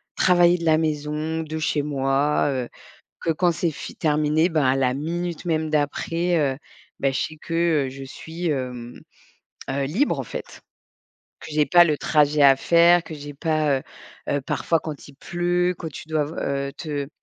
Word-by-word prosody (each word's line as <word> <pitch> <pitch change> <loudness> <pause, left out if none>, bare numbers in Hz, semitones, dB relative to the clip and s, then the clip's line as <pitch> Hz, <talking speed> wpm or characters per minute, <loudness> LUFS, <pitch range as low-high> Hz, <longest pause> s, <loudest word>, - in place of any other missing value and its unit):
travailler 175 -1 +4
de 170 - -4
la 160 -1 +4
maison, 155 +1 -2
de 155 0 -5
chez 155 -1 0
moi, 140 0 +1
heu, 125 -3 -3 0.5
que 165 - +1
quand 175 +2 +2
c'est 165 0 -1
f - - -8
terminé, 155 +1 +2
bah 155 -5 +1
à 130 - +3
la 130 -2 +1
minute 170 +4 -4
même 160 -2 0
d'après, 165 +4 0
heu, 135 -3 0 0.4
bah 135 -1 +1
je 130 - -1
sais 155 - -4
que, 165 -3 +1
heu, - - -4
je 135 +1 -9
suis, 165 +6 -6
hem, 125 -4 -4 0.7
heu, 140 +1 -1
libre, 195 - 0
en - - -4
fait. - - -8 0.8
Que - - -10
j'ai 150 0 +3
pas 175 +5 +7
le 155 -3 +1
trajet 150 -1 +2
à 135 -1 +7
faire, 170 +4 +5
que 160 - -8
j'ai 145 -1 -8
pas, 155 -2 +1
heu - - -15 0.5
heu, 145 - +1
parfois 165 +4 0
quand 150 -2 -8
il 140 - -14
pleut, 175 +3 0
que 165 - -6
tu 155 - -10
dois 155 -1 +1
te - - -8
v - - -4 0.3
heu, - - -8
te 145 -4 -4
155 Hz, 190 wpm, -23 LUFS, 140-165 Hz, 0.8 s, pas